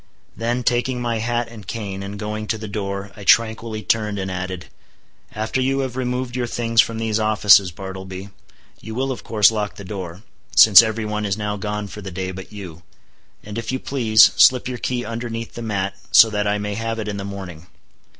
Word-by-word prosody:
Then 120 +3 -2
taking 125 +1 0
my 120 -2 -1
hat 120 +1 -1
and 110 -4 -12
cane 100 -4 -5
and 100 +1 -6
going 105 +1 -4
to 110 - -1
the 110 0 -7
door 100 -1 -4
I 100 - -10
tranquilly 110 +1 +2
turned 105 -2 0
and 95 -1 -3
added—"After 95 +5 -6
you 135 +1 +1
have 130 -2 -4
removed 125 -1 -3
your 125 -1 -1
things 115 -1 +3
from 115 - -4
these 110 -1 -1
offices, 105 -3 +5
Bartleby, 95 +1 -8 0.5
you 110 +1 -8
will 135 +2 -1
of 130 - -6
course 105 -1 +4
lock 105 -2 -3
the 100 - -10
door—since 95 +2 +4
every 110 -1 -2
one 105 0 -3
is 100 -1 -1
now 105 -1 -2
gone 105 0 -4
for 105 - -9
the 95 - -7
day 95 0 -4
but 95 +1 -9
you—and 95 +3 -11
if 115 +1 -4
you 130 - -1
please, 115 -6 +4
slip 125 -1 +5
your 125 -1 -5
key 120 0 -2
underneath 115 0 -5
the 120 - -7
mat, 100 -3 -2 0.2
so 110 - +8
that 105 -1 -1
I 105 0 +1
may 105 0 -3
have 115 +2 -3
it 110 -1 -4
in 105 -1 -3
the 100 - -5
morning. 95 -4 -8
110 Hz, 200 wpm, -21 LUFS, 100-115 Hz, 0.5 s, so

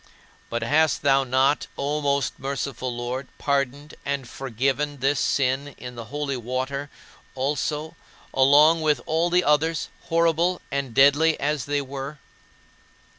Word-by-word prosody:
But 115 - -2
hast 155 0 +2
thou 135 -1 +4
not, 130 +3 +2
O 145 +2 -1
most 140 -3 0
merciful 135 -2 -3
Lord, 120 +2 -4
pardoned 140 +1 -1
and 140 -3 -3
forgiven 135 +4 -2
this 135 +2 +1
sin 135 +1 0
in 125 0 -8
the 115 -1 -8
holy 140 +1 -3
water 130 +4 -3 0.5
also, 150 +4 -2 0.4
along 150 +5 +5
with 150 -4 +2
all 165 +2 +1
the 180 +1 +3
others, 155 +2 +1 0.2
horrible 170 +2 +2
and 135 -4 -3
deadly 145 +4 +5
as 145 -3 -1
they 145 0 0
were? 135 +2 -6
140 Hz, 130 wpm, -24 LUFS, 130-150 Hz, 0.5 s, along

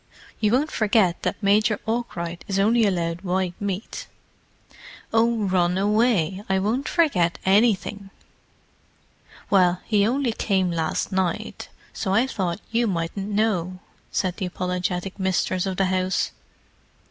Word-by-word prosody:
You 210 -2 +2
won't 290 +5 +2
forget 210 -5 +2
that - - -3
Major 210 +2 +3
Arkwright 175 -7 -3
is 195 -2 -1
only 220 +3 +4
allowed 170 -2 -1
white 185 -1 -1
meat?" 200 +1 -4 1.1
"Oh, 225 -1 +2
run 180 -2 +1
away—I 200 -2 +1
won't 220 +8 -1
forget 195 - +2
anything." 200 0 +2 1.4
"Well, 180 -2 +4
he 210 -2 +3
only 255 0 +1
came 190 -5 0
last 165 +2 -1
night, 185 -2 -2 0.2
so 190 -1 -1
I 230 +4 +4
thought 190 -7 -3
you 230 +1 +2
mightn't 190 +2 -3
know," 200 -4 0 0.3
said 185 -2 -1
the 185 - -2
apologetic 180 +1 -3
mistress 185 0 0
of 190 -1 -3
the 195 - +2
house. 185 0 0
195 Hz, 125 wpm, -24 LUFS, 180-215 Hz, 1.4 s, only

